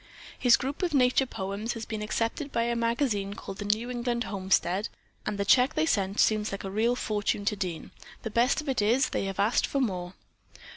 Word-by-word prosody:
His 245 -2 +6
group 275 +3 -4
of 345 -5 0
nature 255 0 +3
poems 200 +3 -4
has 230 -1 -6
been 215 -2 -5
accepted 230 +7 -2
by 230 - +1
a 235 0 0
magazine 230 -4 0
called 195 - -8
The 205 - -4
New 220 +4 0
England 240 -1 -1
Homestead, 190 0 0 0.4
and 210 - -2
the 200 - -1
check 250 +7 +4
they 310 - +2
sent 200 -8 0
seems 215 -1 +3
like 195 - -5
a 195 - -5
real 225 +4 +2
fortune 205 -3 -1
to 210 - +1
Dean. 180 -5 -5 0.3
The 225 - -4
best 245 +7 +2
of 300 - -12
it 255 -4 +1
is, 240 +6 +3
they - - -2
have 195 0 -5
asked 210 +4 +2
for 280 - -1
more." 185 -7 -2
220 Hz, 210 wpm, -28 LUFS, 200-250 Hz, 0.4 s, His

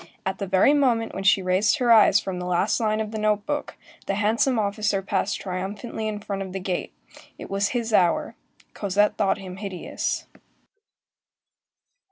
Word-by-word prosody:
At 190 0 -2
the 200 - -3
very 190 +10 +4
moment 245 -6 +1
when 195 - -4
she 195 -1 +4
raised 190 +8 +2
her 245 -4 +2
eyes 210 -3 +7
from 190 -3 -5
the 180 - -4
last 180 +3 +1
line 215 -1 0
of 215 -1 -3
the 220 - -4
note 210 -1 +1
book, 290 0 -4 0.3
the 195 - 0
handsome 225 +5 +1
officer 205 -1 0
passed 195 +1 -1
triumphantly 200 +4 -4
in 215 -1 -3
front 200 -1 -5
of 190 -1 -6
the 195 - -3
gate,—it 185 +1 -7
was 200 0 +1
his 230 -2 -2
hour; 175 -4 +2 0.4
Cosette 205 +1 +1
thought 195 - +1
him 185 -1 -9
hideous. 195 -3 -4
205 Hz, 170 wpm, -24 LUFS, 190-220 Hz, 0.4 s, eyes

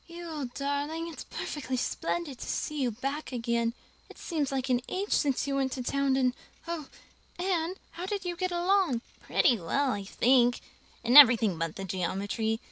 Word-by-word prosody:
"You 345 0 -8
old 290 -6 -5
darling, 285 +4 -2
it's - - -8
perfectly 260 -3 -4
splendid 285 +1 -2
to - - -7
see 300 -2 -2
you 255 - +2
back 275 +7 -4
again. 235 -1 -1 0.3
It - - -14
seems 300 -6 -2
like 265 -1 -1
an 250 -1 +2
age 395 +2 -3
since 275 -4 +2
you 280 - -2
went 265 -1 0
to 255 - -4
town 275 +1 +1
and 255 -2 +2 0.3
oh, 330 -4 -4 0.5
Anne, 355 -1 -1 0.2
how 355 +2 -6
did 400 -2 -3
you 350 -1 -2
get 370 +1 -2
along?" 350 -7 +2 0.2
"Pretty 240 -5 +3
well, 260 +11 0
I 200 - -3
think, 245 +4 +3 0.4
in 240 +2 +2
everything 230 -8 +8
but 165 -1 -2
the 195 - -5
geometry. 200 +5 -2
270 Hz, 180 wpm, -29 LUFS, 240-330 Hz, 0.5 s, everything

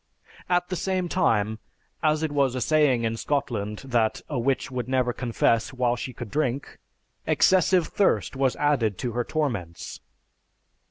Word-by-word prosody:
At 180 0 +1
the 185 - -2
same 185 0 -1
time, 110 - +1 0.4
as 155 0 +2
it 155 - -1
was 140 -3 +1
a - - -1
saying 145 -6 +3
in 115 0 -1
Scotland 115 -6 -2
that 120 -4 +1
a 145 -5 -2
witch 130 +2 0
would 125 -1 -4
never 130 -2 +1
confess 115 -1 0
while 125 -1 +1
she 125 +2 -5
could 120 -3 -8
drink, 140 -2 -2 0.5
excessive 185 -1 +4
thirst 135 - +1
was 135 -1 +1
added 125 -9 +1
to 120 - -3
her 120 +2 -1
torments. 115 - -3
130 Hz, 155 wpm, -25 LUFS, 115-150 Hz, 0.5 s, excessive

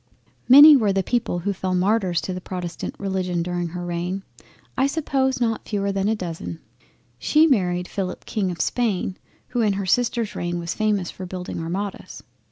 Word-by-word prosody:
Many 290 +4 +11
were 215 -7 +3
the 195 0 +1
people 235 -6 -1
who 200 +4 -1
fell 185 -1 -2
martyrs 185 -1 +1
to 185 - -4
the 180 - -5
protestant 180 -2 -5
Religion 185 -3 -2
during 175 0 -2
her 175 +1 -6
reign; 175 +3 -3 0.5
I 265 - +2
suppose 270 -4 0
not 225 -2 -1
fewer 200 -2 0
than 195 0 -1
a 220 - +2
dozen. 165 - -6 0.6
She 310 +1 +4
married 180 - +1
Philip 185 -2 -4
King 200 -4 -1
of 170 -3 -3
Spain 200 -5 -1 0.3
who 245 -2 0
in 210 -3 +2
her 195 0 -3
sister's 235 +2 0
reign 175 0 -2
was 170 -1 -3
famous 210 -5 0
for 185 - -8
building 180 -1 -6
Armadas. 185 +5 -5
195 Hz, 175 wpm, -23 LUFS, 180-225 Hz, 0.6 s, Many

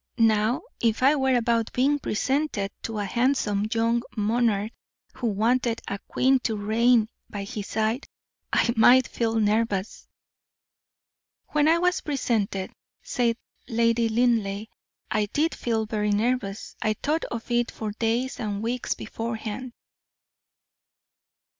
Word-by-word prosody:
"Now, 220 +1 +3 0.2
if 230 +1 +1
I 280 +3 +6
were 265 -2 +2
about 230 -1 +1
being 280 +4 +2
presented 260 -4 -1
to 225 -1 -4
a 205 - -1
handsome 215 -2 +1
young 230 0 +2 0.2
monarch, 215 -1 +1 0.4
who 250 -2 -3
wanted 230 +3 +1
a 200 - -3
queen 265 +1 +3
to 225 -3 -1
reign 220 +2 +3 0.2
by 205 -2 -5
his 200 0 -6
side, 220 +5 -1 0.4
I 235 - +2
might 245 +3 +6
feel 225 -1 -1
nervous." 215 -2 0 1.4
"When 300 0 +2
I 325 +1 +5
was 360 +1 +1
presented," 220 -9 -1 0.3
said 235 -2 0 0.3
Lady 230 -1 +2
Linleigh, 220 -3 +1 0.5
"I 215 -1 +1
did 310 +9 0
feel 225 -2 -1
very 210 -1 -1
nervous. 210 -1 -1
I 215 - +1
thought 300 +9 -1
of 235 +1 -6
it 240 0 +2
for 215 -1 -5
days 230 +4 -1
and 210 -1 -3
weeks 240 +2 -1
beforehand." 225 +2 -5
230 Hz, 130 wpm, -25 LUFS, 215-250 Hz, 1.4 s, I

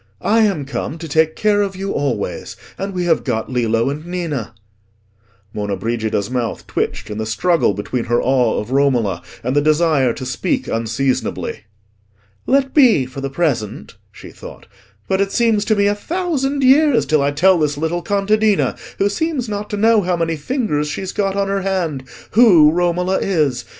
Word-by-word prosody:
"I 225 +2 +3
am 195 -10 +1
come 140 +3 -4
to 165 0 -7
take 160 +1 +1
care 210 -1 +2
of 195 -2 -2
you 195 +1 -4
always. 140 -1 -3 0.2
And 195 +1 -4
we 180 -1 -1
have 165 -2 +2
got 115 -2 -2
Lillo 115 0 +1
and 150 +2 -6
Ninna." 165 - -4 1.0
Monna 105 -1 -2
Brigida's 110 -1 -2
mouth 125 -2 -3
twitched - - -3
in 105 - -5
the 110 - -2
struggle 120 - +1
between 115 +4 -3
her 120 +1 +1
awe 125 -3 +1
of 105 +4 -6
Romola 125 -10 +1 0.2
and 125 +3 -1
the 145 - +4
desire 155 -4 +2
to 130 - -7
speak 125 -1 -2
unseasonably. 115 0 -2 0.8
"Let 270 0 +2
be, 240 - +5
for 130 +2 -8
the 135 - -3
present," 135 - -2 0.2
she - - -12
thought; - - -12 0.4
"but 190 0 +1
it 200 0 0
seems 225 -3 +2
to 215 - +2
me 200 0 +2
a 205 - +3
thousand 285 - -2
years 275 0 +4
till 155 -2 +2
I 140 - +2
tell 175 +5 +3
this 150 -2 0
little 160 +3 -2
contadina, 205 +2 +1 0.2
who 200 - +2
seems 265 +4 -2
not 210 0 -4
to 210 - -3
know 220 +1 +4
how 180 -1 -1
many 165 -1 -1
fingers 150 - -2
she's 185 +5 -4
got 195 -1 -1
on 200 0 0
her 195 0 -1
hand, 175 -8 -2 0.3
who 185 -10 +6
Romola 180 +2 0
is. 145 -10 0
165 Hz, 180 wpm, -18 LUFS, 130-200 Hz, 1.0 s, who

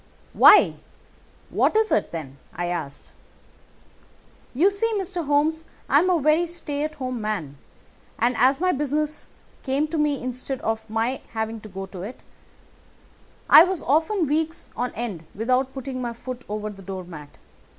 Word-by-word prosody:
"'Why, - - +7 0.7
what - - +2
is 440 0 +2
it, - - +1
then?' 140 -5 -7 0.2
I 175 - -2
asked. 170 -5 -5 1.4
You 345 +10 +3
see, 455 +3 0
Mr. 360 -4 -3
Holmes, 305 +3 +2 0.2
I 285 - +5
am 365 +4 +2
a 355 -2 +3
very 310 +4 +3
stay 300 -4 -4
at 305 0 -3
home 255 -4 -4
man, 175 -10 -4 0.6
and 240 +2 +1
as 260 +4 +3
my 365 +1 +2
business 295 +1 -2 0.3
came 275 +3 0
to 320 0 -2
me 295 -2 +1
instead 255 +1 -4
of 225 0 -3
my 225 +4 -1
having 220 0 -3
to 215 - -11
go 195 0 -6
to 190 -2 -9
it, 215 +7 -8 1.3
I 315 - +10
was 370 -2 -2
often 320 - +2
weeks 320 +3 -2
on 245 0 -2
end 200 -9 -5
without 255 +5 +1
putting 265 -1 -5
my 240 -1 -3
foot 250 +1 -8
over 210 0 -3
the 195 -1 -12
door 190 0 -6
mat. 150 -5 -11
255 Hz, 160 wpm, -24 LUFS, 215-305 Hz, 1.4 s, I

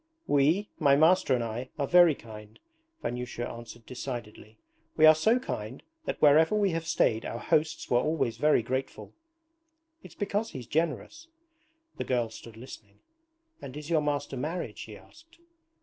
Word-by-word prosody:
'We, 155 +9 +2
my 140 -4 +5
master 160 -2 +4
and 120 - -1
I, 115 +3 -5
are 140 - 0
very 175 0 +6
kind,' 105 -2 -12 0.5
Vanyusha 120 0 -4
answered 120 0 -10
decidedly. 120 -4 -7 0.4
'We 155 - +6
are 155 - +10
so 220 +10 +2
kind 125 - -6 0.2
that - - -3
wherever 155 +6 +5
we 205 -3 +2
have 165 -1 -3
stayed 110 -7 +1
our - - -5
hosts 155 +5 0
were 120 - +3
always 150 -5 -1
very 150 -5 +3
grateful. 130 +3 -4 0.9
It's - - -14
because 205 +2 -2
he's 125 -3 -7
generous.' 170 - -2 0.7
The - - -2
girl 120 -3 -1
stood 110 0 -12
listening. 110 -4 -12 0.6
'And 140 0 -8
is 150 +2 -8
your 160 -2 +3
master 145 -2 -2
married?' 155 -4 -4
she 105 -2 -9
asked. 330 - -20
140 Hz, 155 wpm, -28 LUFS, 120-160 Hz, 0.9 s, are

